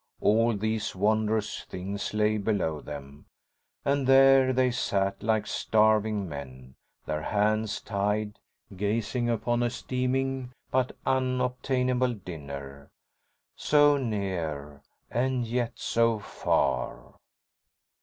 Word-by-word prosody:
All 115 +1 +3
these 110 +1 -2
wondrous 110 +2 0
things 95 +2 -5
lay 105 0 +1
below 95 -8 -1
them, 70 -1 -9 0.6
and 140 -1 +1
here 135 0 +6
they 130 0 +2
sat, 100 -4 -1
like 110 -1 +1
starving 110 -2 +2
men, 65 -4 -9 0.3
their 75 0 -2
hands 105 +4 0
tied, 105 +1 -2 0.4
gazing 110 +4 -1
upon 120 +1 0
a 120 - +2
steaming 130 +1 -2 0.2
but 130 -1 0
unobtainable 125 -1 0
dinner. 70 -6 -8 0.7
So 145 -1 +4
near 85 - -3 0.3
and 125 0 0
yet 120 0 -1
so 115 -1 +1
far. - - -1
110 Hz, 100 wpm, -28 LUFS, 95-125 Hz, 0.7 s, here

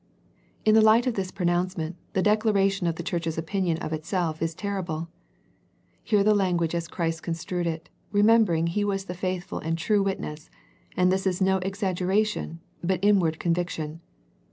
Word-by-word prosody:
In 215 - +5
the 220 - +7
light 220 +3 +5
of 250 - +1
this 195 -3 -2
pronouncement 175 -2 -1 0.2
the 190 - +1
dec 210 +1 +4
laration 195 -4 +2
of 165 - -2
the 170 - -5
church's 165 -3 -2
opinion 170 0 -1
of 155 - -4
itself 160 0 -2
is 165 0 -1
ter 200 0 -2
rible. 165 -1 -4 0.9
Hear 205 -2 +3
the 215 +1 +5
language 175 -5 +1
as 170 -1 -2
Christ 165 -2 -2
construed 170 +1 -3
it, 160 -1 -4 0.2
remembering 205 -5 +4
He 175 +5 0
was 195 -1 -1
the 180 - -5
faithful 185 0 -3
and 165 +1 -2
true 205 +5 +2
Witness, 160 -6 -3 0.5
and 180 0 +4
this 190 +1 +1
is 180 -1 0
no 190 0 +3
exaggeration, 190 -1 -1 0.2
but 185 0 +1
in 205 -1 +5
ward 160 -3 0
conviction. 165 -2 -2
180 Hz, 175 wpm, -26 LUFS, 165-200 Hz, 0.9 s, the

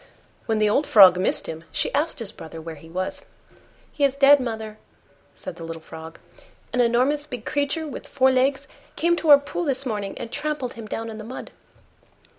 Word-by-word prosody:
When 225 - +1
the 215 0 +3
old 275 +8 +1
Frog 185 -4 +8
missed 185 - +2
him, 160 0 -6
she - - -2
asked 300 +4 +1
his 225 -5 -2
brother 165 -5 -10
where 165 0 -7
he 160 +1 -14
was. 185 +3 -3 0.7
"He 290 - -3
is 275 -1 +2
dead, 280 +1 +7
mother," 220 -3 -5 0.6
said - - -8
the 165 - -8
little 165 0 -6
Frog; 160 0 -10 0.6
"an 250 - +3
enormous 255 +5 +2
big 250 -6 -7
creature 290 +2 -1
with 290 - -8
four 265 -1 +3
legs 265 +1 +1 0.3
came 345 +1 +2
to 325 - -1
our 290 - +11
pool 285 +5 -4
this 275 -2 -1
morning 205 -5 -3
and 230 - -7
trampled 295 -5 -3
him 225 -2 -9
down 225 +1 -4
in 220 - -8
the - - -7
mud." 245 +4 -8
240 Hz, 200 wpm, -23 LUFS, 205-280 Hz, 0.7 s, our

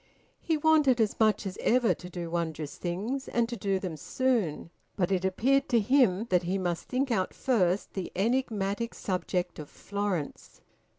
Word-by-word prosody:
He 320 -2 0
wanted 300 -5 +4
as 220 -2 +1
much 215 -2 +3
as 195 0 -5
ever 245 0 +3
to 180 - -10
do 175 -2 -6
wondrous 160 -3 -3
things, 210 +10 -3
and 235 -1 +1
to 240 - -4
do 200 -4 0
them 185 -4 -4
soon, 215 - -1 0.2
but 185 -1 0
it 185 -1 +1
appeared 255 +9 +2
to 235 - +4
him 225 -3 +3
that 180 -1 +4
he 185 +2 -1
must 175 -3 -2
think 265 +1 0
out 190 -5 0
first 195 -7 +1
the 190 -2 -4
enigmatic 225 0 -1
subject 180 -2 -2
of 150 - -8
Florence. 200 -7 -4
200 Hz, 170 wpm, -29 LUFS, 180-240 Hz, 0.2 s, wanted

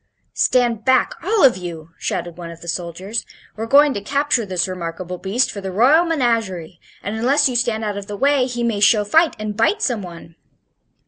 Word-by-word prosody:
"Stand 240 -3 +1
back, 260 +1 +2
all 415 +3 +1
of 255 -7 +5
you!" 165 -3 -8
shouted 175 -1 -3
one 170 -1 -8
of 170 0 -11
the 170 - -11
soldiers. 180 +5 -4 0.3
"We're 225 +1 -5
going 285 +3 +5
to 200 - -4
capture 270 -1 0
this 185 -2 0
remarkable 180 0 -6
beast 215 +7 0
for 200 - -7
the 190 -1 -5
royal 270 - +4
menagerie, 225 - -1 0.2
and 205 +3 -4
unless 275 +6 +3
you 255 - -3
stand 235 -2 0
out 205 -2 -3
of 200 0 -7
the 205 - -6
way 275 +1 +2
he 240 -2 -4
may 230 -3 0
show 210 +1 +4
fight 320 +9 +3
and 215 -1 -5
bite 410 - +1
some 240 -5 0
one." 170 -2 -11
215 Hz, 200 wpm, -20 LUFS, 185-255 Hz, 0.3 s, of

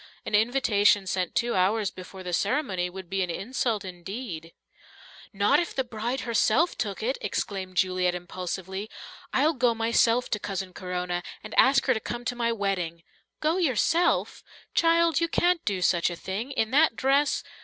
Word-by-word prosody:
An - - -6
invitation 210 -3 +3
sent 185 -1 -2
two 235 0 +1
hours 195 +2 +1
before 185 +1 -10
the 180 -1 -5
ceremony 190 - 0
would 190 0 -9
be 195 +2 -1
an 180 - -1
insult 220 +2 -2
indeed." 180 -2 -7 0.8
"Not 205 +8 +3
if 345 - -3
the 265 - +1
bride 240 +2 -3
herself 235 +7 +2
took 205 -3 -3
it!" 255 +4 -1
exclaimed 190 -2 -3
Juliet 185 -1 +2
impulsively. 185 +3 -5 0.4
"I'll 300 +5 +3
go 245 -4 +2
myself 230 +2 +2
to 210 - 0
Cousin 190 -2 -4
Corona, 180 -1 -3 0.2
and 215 - -8
ask 270 +1 +5
her 260 - +4
to 220 - -2
come 240 +2 -6
to 245 - -2
my 235 -1 0
wedding." 185 -6 -2 0.4
"Go 315 +3 +1
yourself! 335 - +1 0.3
Child, 335 -1 +3
you 335 - +2
can't 350 0 +2
do 190 -3 -1
such 175 -1 +3
a 175 - -5
thing! 195 +8 -4
In 225 -4 -1
that 295 -2 +4
dress...." 275 +3 +2
215 Hz, 165 wpm, -27 LUFS, 185-255 Hz, 0.8 s, ask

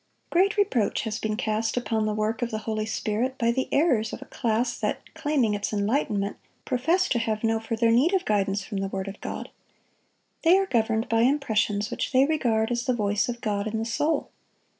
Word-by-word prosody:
Great 390 +5 +3
reproach 265 - +1
has 220 -1 -3
been 215 -1 -2
cast 220 0 -1
upon 220 -3 0
the 215 - 0
work 215 +2 -1
of 240 - 0
the 220 - -3
Holy 215 -1 -2
Spirit 225 +4 -1
by 235 -1 +2
the 260 +2 -1
errors 250 -8 +2
of - - -6
a - - -10
class 235 0 -1
that, - - -1
claiming 290 -8 +1
its 205 0 -2
enlightenment, 205 -1 0 0.3
profess 330 +9 +1
to 240 - +1
have 220 -1 -2
no 225 0 +2
further 230 +1 +1
need 260 +9 +4
of 375 - 0
guidance 200 -1 +1
from 200 0 -4
the 195 - -1
word 195 0 -4
of 195 +1 -8
God. - - -6 0.9
They 340 +3 +6
are 390 - +2
governed 225 -7 +1
by 225 0 +2
impressions 220 -6 +1
which - - -3
they 260 +1 +6
regard 235 -7 +1
as 240 +1 -1
the 255 - +2
voice 210 0 0
of 240 0 -4
God 205 -2 -1
in 220 +1 -2
the 225 - -2
soul. 295 +6 0
225 Hz, 205 wpm, -26 LUFS, 215-260 Hz, 0.9 s, They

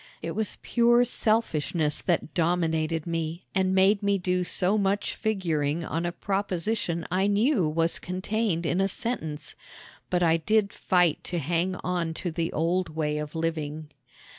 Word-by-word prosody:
It 165 - -3
was 215 +3 -2
pure 240 0 +4
selfishness 170 -10 +1
that 170 -3 -1
dominated 165 -2 0
me 165 0 -3
and 190 0 +1
made 195 +2 +4
me 200 -1 +2
do 180 0 0
so 185 +2 +2
much 200 0 0
figuring 165 -7 -1
on 165 +2 -2
a - - -2
proposition 190 -2 -2
I 190 +2 +2
knew 205 - +2
was 165 +2 +1
contained 185 -1 -2
in 175 +3 +1
a 195 - +3
sentence; 160 -9 -3 0.6
but 180 0 +1
I 165 -1 +4
did 210 +4 +1
fight 180 -4 +2
to 175 - -3
hang 170 +4 0
on 175 -3 -1
to 175 - -3
the 165 +1 -2
old 170 +3 0
way 150 -1 -2
of 150 +1 -6
living. 155 -2 -3
175 Hz, 155 wpm, -27 LUFS, 160-195 Hz, 0.6 s, pure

